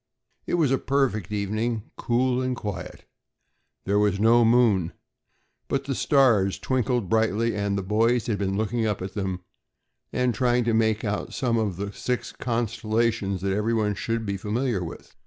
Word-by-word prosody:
It -, -, +1 dB
was 155 Hz, -6 st, +2 dB
a 135 Hz, -, +2 dB
perfect 130 Hz, -9 st, 0 dB
evening, 110 Hz, +2 st, -2 dB
cool 125 Hz, +1 st, +1 dB
and 130 Hz, 0 st, -1 dB
quiet. 100 Hz, -6 st, -6 dB, 0.8 s
There 100 Hz, +1 st, +1 dB
was 105 Hz, -2 st, +2 dB
no 115 Hz, +2 st, +5 dB
moon, 110 Hz, -7 st, +3 dB, 0.7 s
but 135 Hz, 0 st, -1 dB
the 135 Hz, 0 st, -2 dB
stars 125 Hz, -7 st, +3 dB
twinkled 125 Hz, -4 st, 0 dB
brightly, 110 Hz, +1 st, +1 dB
and 100 Hz, -1 st, -1 dB
the 100 Hz, -, -2 dB
boys 115 Hz, +4 st, +2 dB
had 105 Hz, -4 st, -1 dB
been 95 Hz, -1 st, -1 dB
looking 110 Hz, +2 st, -1 dB
up 105 Hz, -3 st, -2 dB
at 95 Hz, -, -6 dB
them 95 Hz, -3 st, -3 dB, 0.7 s
and 125 Hz, -1 st, +1 dB
trying 120 Hz, +2 st, +2 dB
to 115 Hz, 0 st, +1 dB
make 110 Hz, -1 st, +2 dB
out 100 Hz, -1 st, -3 dB
some 120 Hz, -3 st, +1 dB
of 100 Hz, -5 st, -1 dB
the 100 Hz, +1 st, -4 dB
six 125 Hz, -1 st, -3 dB
constellations 115 Hz, -4 st, -1 dB
that 95 Hz, 0 st, 0 dB
everyone 105 Hz, 0 st, +1 dB
should 115 Hz, +3 st, -2 dB
be 100 Hz, -1 st, -2 dB
familiar 110 Hz, 0 st, -1 dB
with. 80 Hz, -, -9 dB
110 Hz, 165 wpm, -25 LUFS, 100-120 Hz, 0.8 s, no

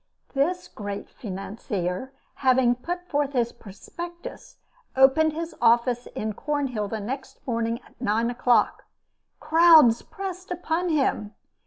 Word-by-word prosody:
This 350 Hz, +6 st, 0 dB
great 205 Hz, -1 st, -7 dB
financier, 195 Hz, +1 st, -4 dB, 0.3 s
having 255 Hz, -2 st, +4 dB
put 350 Hz, +8 st, -5 dB
forth 290 Hz, -2 st, -1 dB
his 235 Hz, -2 st, +1 dB
prospectus, 345 Hz, -, -10 dB, 0.4 s
opened 275 Hz, +4 st, +5 dB
his 330 Hz, +1 st, -5 dB
office 240 Hz, +1 st, +3 dB
in 215 Hz, 0 st, -2 dB
Cornhill 270 Hz, -5 st, -2 dB
next 225 Hz, +6 st, -5 dB
morning 230 Hz, -1 st, -1 dB
at -, -, -23 dB
nine 225 Hz, +3 st, +1 dB
o'clock. 245 Hz, 0 st, +2 dB, 0.5 s
Crowds 315 Hz, -8 st, +6 dB
pressed 375 Hz, -2 st, -7 dB
upon 355 Hz, 0 st, -1 dB
him. 270 Hz, -9 st, 0 dB
260 Hz, 115 wpm, -25 LUFS, 230-320 Hz, 0.5 s, Crowds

